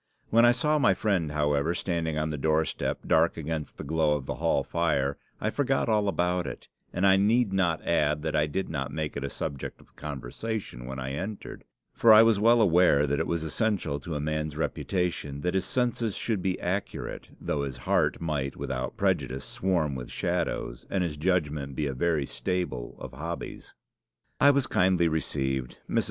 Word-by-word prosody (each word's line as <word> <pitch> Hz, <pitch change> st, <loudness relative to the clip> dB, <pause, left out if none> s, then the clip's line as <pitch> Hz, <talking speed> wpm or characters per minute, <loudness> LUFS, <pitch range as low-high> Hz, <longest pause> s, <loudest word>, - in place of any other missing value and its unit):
When 115 Hz, +2 st, +6 dB
I 120 Hz, -, +7 dB
saw 150 Hz, +5 st, +2 dB
my 95 Hz, -9 st, +4 dB
friend, 90 Hz, -8 st, 0 dB
however, 75 Hz, +2 st, +1 dB
standing 85 Hz, -3 st, -1 dB
on 80 Hz, 0 st, -1 dB
the 75 Hz, -, -3 dB
doorstep, 80 Hz, +1 st, 0 dB
dark 80 Hz, +1 st, +3 dB
against 80 Hz, -1 st, -4 dB
the -, -, -6 dB
glow 80 Hz, 0 st, +2 dB
of 70 Hz, -3 st, -4 dB
the -, -, -4 dB
hall -, -, +1 dB
fire, 70 Hz, -5 st, 0 dB, 0.2 s
I 110 Hz, -, -1 dB
forgot 135 Hz, -2 st, +1 dB
all 105 Hz, -2 st, +2 dB
about 90 Hz, -2 st, 0 dB
it; -, -, -7 dB, 0.2 s
and 90 Hz, -, 0 dB
I 95 Hz, 0 st, +6 dB
need 105 Hz, +1 st, +3 dB
not 85 Hz, -4 st, +1 dB
add 75 Hz, -2 st, +1 dB
that 80 Hz, 0 st, -1 dB
I 75 Hz, 0 st, +3 dB
did 95 Hz, +6 st, -2 dB
not 70 Hz, -4 st, -3 dB
make 80 Hz, -1 st, -3 dB
it 70 Hz, -, -3 dB
a 70 Hz, -, -2 dB
subject 70 Hz, -1 st, -5 dB
of -, -, -22 dB
conversation 70 Hz, -, -5 dB
when 65 Hz, +1 st, -5 dB
I 65 Hz, 0 st, -4 dB
entered, 95 Hz, +9 st, -6 dB, 0.3 s
for 115 Hz, -, +5 dB
I 110 Hz, +1 st, +10 dB
was 115 Hz, -3 st, +4 dB
well 115 Hz, +2 st, +5 dB
aware 85 Hz, -6 st, +5 dB
that 70 Hz, 0 st, 0 dB
it -, -, 0 dB
was 85 Hz, -1 st, -1 dB
essential 85 Hz, -4 st, -1 dB
to 80 Hz, +2 st, -5 dB
a -, -, -1 dB
man's 75 Hz, 0 st, -2 dB
reputation 80 Hz, -4 st, -2 dB
that 90 Hz, +2 st, 0 dB
his 95 Hz, -, +1 dB
senses 120 Hz, -4 st, 0 dB
should 110 Hz, -5 st, -1 dB
be 95 Hz, 0 st, -1 dB
accurate, 95 Hz, +3 st, -4 dB
though 75 Hz, -, -1 dB
his 70 Hz, -3 st, -4 dB
heart 65 Hz, -, +1 dB
might 75 Hz, -5 st, -2 dB
without 65 Hz, -1 st, -4 dB
prejudice 65 Hz, +1 st, 0 dB
swarm 85 Hz, -6 st, 0 dB
with 65 Hz, -2 st, -6 dB
shadows, -, -, -2 dB
and 95 Hz, -2 st, 0 dB
his 80 Hz, -4 st, -2 dB
judgment 75 Hz, -5 st, -1 dB
be 75 Hz, -, -1 dB
a 70 Hz, -, -2 dB
very 75 Hz, +1 st, +1 dB
stable 65 Hz, -1 st, -3 dB
of -, -, -8 dB
hobbies. 80 Hz, +6 st, -6 dB, 0.6 s
"I 145 Hz, -, +7 dB
was 140 Hz, -2 st, +3 dB
kindly 90 Hz, -5 st, +3 dB
received. 65 Hz, -5 st, -2 dB
Mrs. -, -, +1 dB
80 Hz, 190 wpm, -28 LUFS, 70-95 Hz, 0.6 s, I